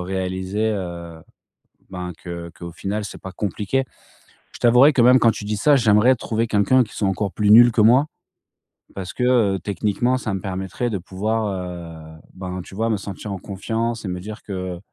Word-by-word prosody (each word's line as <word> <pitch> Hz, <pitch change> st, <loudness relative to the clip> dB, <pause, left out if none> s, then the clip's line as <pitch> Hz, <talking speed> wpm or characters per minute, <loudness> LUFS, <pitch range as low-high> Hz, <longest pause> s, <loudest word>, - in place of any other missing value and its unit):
réaliser, 95 Hz, +3 st, -2 dB
heu, 85 Hz, -3 st, -7 dB, 0.7 s
ben, 90 Hz, -1 st, -6 dB
que 85 Hz, 0 st, -7 dB
qu'au 85 Hz, -1 st, -8 dB
final, 105 Hz, +5 st, -4 dB
c'est 100 Hz, -, -9 dB
pas 95 Hz, -1 st, -8 dB
compliqué. 105 Hz, +7 st, -1 dB, 0.7 s
Je -, -, -11 dB
t'avouerais 125 Hz, +5 st, +6 dB
que, 125 Hz, -, +3 dB
même 125 Hz, +1 st, +7 dB
quand 115 Hz, -, +5 dB
tu 105 Hz, -, -7 dB
dis 105 Hz, -, -2 dB
ça, 145 Hz, +7 st, +4 dB
j'aimerais 115 Hz, +1 st, +4 dB
trouver 115 Hz, -1 st, -2 dB
quelqu'un 110 Hz, +5 st, +3 dB
qui 110 Hz, -, -12 dB
soit 100 Hz, -, 0 dB
encore 95 Hz, 0 st, -1 dB
plus 105 Hz, -1 st, +1 dB
nul 120 Hz, +2 st, +8 dB
que 110 Hz, -, +2 dB
moi. 125 Hz, +7 st, +5 dB, 0.9 s
Parce 95 Hz, -1 st, -6 dB
que, 125 Hz, -, -2 dB, 0.3 s
heu, -, -, -5 dB
techniquement, 105 Hz, +6 st, 0 dB
ça 110 Hz, -5 st, -4 dB
me 95 Hz, -, -3 dB
permettrait 95 Hz, +5 st, -3 dB
de 105 Hz, -4 st, -2 dB
pouvoir, 105 Hz, +4 st, -2 dB, 0.7 s
heu, -, -, -20 dB
ben, 90 Hz, -1 st, -6 dB
tu 95 Hz, -, -13 dB
vois, 115 Hz, +2 st, 0 dB
me 110 Hz, -, +2 dB
sentir 100 Hz, +1 st, -7 dB
en 95 Hz, -, -4 dB
confiance 115 Hz, +4 st, -3 dB
et 95 Hz, -, -3 dB
me 90 Hz, 0 st, -4 dB
dire 105 Hz, +3 st, -8 dB
que 95 Hz, -3 st, -5 dB
105 Hz, 195 wpm, -21 LUFS, 95-115 Hz, 0.9 s, nul